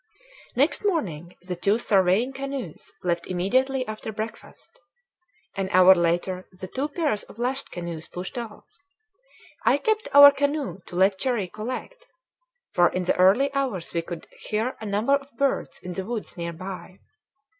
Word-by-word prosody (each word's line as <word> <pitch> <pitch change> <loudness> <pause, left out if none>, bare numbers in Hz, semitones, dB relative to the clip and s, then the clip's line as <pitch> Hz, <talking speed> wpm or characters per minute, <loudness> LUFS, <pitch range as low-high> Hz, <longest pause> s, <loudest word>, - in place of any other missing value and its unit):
Next 280 +10 +2
morning 180 - -2
the 180 0 -4
two 200 +5 +2
surveying 205 +3 +2
canoes 270 - -6
left 170 -1 -1
immediately 255 +9 +1
after 215 0 -5
breakfast. 220 - -8 0.8
An 195 -1 -2
hour 185 +1 +8
later 175 +1 0
the 190 - -5
two 265 +9 -2
pairs 290 - -1
of - - -15
lashed 255 +3 -2
canoes 170 -2 -6
pushed 180 +8 -7
off. 230 -4 -7 1.0
I - - +4
kept 435 -1 0
our 285 0 +10
canoe 285 - -1
to - - -9
let 190 +1 +3
Cherrie 235 -8 -1
collect, 255 - -6 0.6
for 175 -1 +4
in 185 - -2
the 180 - +1
early 210 +10 +4
hours 255 -11 -2
we 170 - 0
could 170 0 -8
hear 220 +4 -2
a 220 - -5
number 210 +7 +1
of 280 -3 -2
birds 275 +1 0
in 180 - -5
the 190 - -3
woods 225 +1 -5
near 170 -2 -4
by. 185 +1 -8
210 Hz, 155 wpm, -25 LUFS, 180-270 Hz, 1.0 s, our